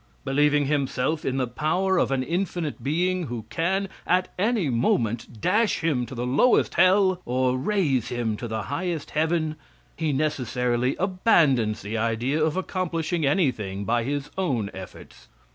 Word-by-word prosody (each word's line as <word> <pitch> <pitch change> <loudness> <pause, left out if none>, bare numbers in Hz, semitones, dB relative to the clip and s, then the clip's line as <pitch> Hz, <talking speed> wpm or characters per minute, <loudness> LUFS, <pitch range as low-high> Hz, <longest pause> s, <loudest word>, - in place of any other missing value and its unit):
Believing 145 +1 +3
himself 140 +1 0
in 135 0 -1
the 130 - +1
power 170 +9 0
of - - +2
an 135 -1 0
infinite 170 -1 -2
being, 175 +4 0
who 115 -2 -5
can, 190 +4 0 0.2
at 180 +1 +2
any 210 -4 +1
moment, 115 -2 0
dash 210 - +2
him 130 -7 0
to 130 - -8
the 120 +1 -3
lowest 140 - +3
hell 185 -1 +4
or 125 +1 +1
raise 140 - 0
him 120 -3 -1
to 120 - -5
the 110 -1 -3
highest 170 - -3
heaven, 160 0 0 0.4
he 160 -2 -1
necessarily 125 -3 0
abandons 160 - +2
the 110 +2 -3
idea 120 +7 0
of 155 +2 0
accomplishing 170 -4 -1
anything 110 - 0
by 120 +2 +1
his 145 +3 -3
own 125 - -1
efforts. 90 -9 -11
145 Hz, 150 wpm, -25 LUFS, 120-175 Hz, 0.4 s, hell